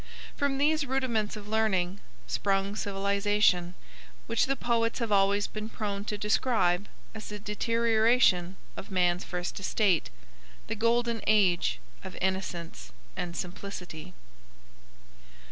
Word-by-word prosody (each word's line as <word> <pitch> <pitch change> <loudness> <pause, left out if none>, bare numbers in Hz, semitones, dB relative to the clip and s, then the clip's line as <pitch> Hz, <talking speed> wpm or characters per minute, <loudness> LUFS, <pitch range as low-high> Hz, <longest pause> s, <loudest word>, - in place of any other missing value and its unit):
From 280 -1 0
these 305 +2 +2
rudiments 245 -6 0
of 205 -1 -9
learning 200 -4 +1 0.3
sprung 195 0 0
civilization, 200 -3 +1 0.5
which - - +1
the 275 - +1
poets 230 -2 0
have 230 -3 -2
always 200 0 +3
been 215 0 -6
prone 205 -2 -4
to 210 - -3
describe 210 -3 +1 0.3
as 220 -1 -8
a 210 - -4
deterioration 220 -3 +2 0.2
of - - -8
man's 180 -2 +2
first 180 +1 -4
estate, 195 -2 +1 0.6
the 225 - -3
Golden 230 +1 +1
Age 180 - +3 0.2
of - - -8
innocence 185 -3 -3 0.2
and 180 -2 -4
simplicity. 180 - -7
205 Hz, 115 wpm, -29 LUFS, 185-225 Hz, 0.6 s, always